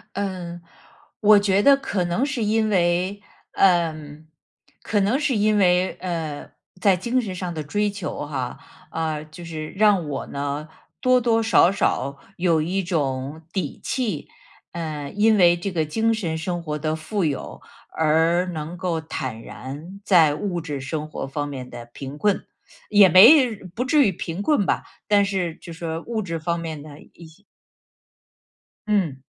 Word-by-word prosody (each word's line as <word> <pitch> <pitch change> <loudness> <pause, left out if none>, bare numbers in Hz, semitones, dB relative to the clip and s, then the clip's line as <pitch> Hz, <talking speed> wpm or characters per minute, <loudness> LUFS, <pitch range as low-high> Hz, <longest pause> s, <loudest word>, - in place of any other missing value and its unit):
嗯， 180 -3 -4 0.6
我 210 -1 +7
觉 200 -1 +2
得 280 +4 +6
可 205 -9 -2
能 175 +9 0
是 265 -5 -2
因 215 +1 +2
为 185 +1 +1 0.3
呃， 175 -4 +3 0.9
可 205 - 0
能 205 +6 +2
是 300 -4 0
因 210 +1 +3
为， 180 -1 +3
呃， 165 -5 -4 0.3
在 195 -3 +4
精 240 +7 0
神 205 -5 -5
上 180 -1 -4
的 155 -2 -4
追 205 +8 0
求 200 -7 -5
哈， 130 -4 -4 0.3
嗯， 155 -2 -3
就 175 +2 -10
是 155 -2 -6
让 200 -5 +3
我 140 - -4
呢， 145 +2 -4 0.3
多 255 0 +3
多 225 -1 +2
少 220 -5 +5
少 140 -7 -1 0.2
有 170 -3 +2
一 185 +5 -1
种 145 -3 -2
底 175 -8 -3
气。 220 - -2 0.5
嗯， 155 -4 -5
因 220 +1 +5
为 175 -3 +5
这 175 +3 -3
个 170 -4 0
精 225 +9 +1
神 170 -8 -2
生 175 +1 -3
活 150 -2 -3
的 155 +1 -1
富 180 +4 -2
有 145 -4 -4 0.3
而 160 +3 +2
能 160 +2 -5
够 170 -2 -2
坦 130 -7 -5
然 150 +12 -9
在 165 -7 +5
物 175 +2 -3
质 150 -3 -5
生 150 +3 -4
活 - - -5
方 145 +1 -3
面 130 -3 -7
的 120 - -9
贫 135 +4 -8
困。 200 +4 +1 0.4
也 205 -3 +7
没 240 - +8 0.2
不 245 - -1
至 280 +2 +4
于 190 - 0
贫 165 +2 -5
困 220 -2 +2
吧， - - 0 0.2
但 205 -1 +4
是 185 -4 -2
就 170 0 -11
说 165 -1 -4
物 230 -2 -2
质 165 -5 -4
方 170 +2 -1
面 160 -3 -5
的 150 0 -12
一 170 - -16
些 160 +6 -20 1.4
嗯 180 -11 0
175 Hz, 175 characters per minute, -23 LUFS, 155-205 Hz, 1.4 s, 没